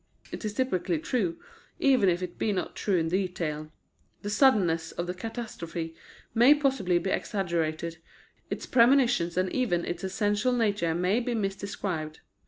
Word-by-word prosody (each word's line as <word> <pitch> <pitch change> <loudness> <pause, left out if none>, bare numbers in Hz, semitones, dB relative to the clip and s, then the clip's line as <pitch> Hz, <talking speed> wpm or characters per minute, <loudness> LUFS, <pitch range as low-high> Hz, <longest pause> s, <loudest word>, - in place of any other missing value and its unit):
It - - -6
is 210 -1 -3
typically 185 -9 0
true, 185 - -1 0.4
even 255 -8 +4
if 175 +1 0
it 175 -1 -7
be 215 - +1
not 185 -3 -3
true 195 -3 +1
in 165 -1 0
detail. 165 -5 -2 0.5
The 205 - -3
suddenness 205 - +3
of 170 - -4
the 180 - -3
catastrophe 180 -6 -5 0.4
may 245 +6 +7
possibly 265 -12 +1
be 190 +2 -1
exaggerated, 170 -4 -2 0.5
its - - -4
premonitions 235 -9 +4
and 185 0 +1
even 195 -10 +1
its 175 +1 -4
essential 205 +5 +1
nature 205 -8 +1
may 180 +6 +2
be 245 -1 -2
misdescribed. 195 -6 -3
190 Hz, 150 wpm, -28 LUFS, 170-225 Hz, 0.5 s, may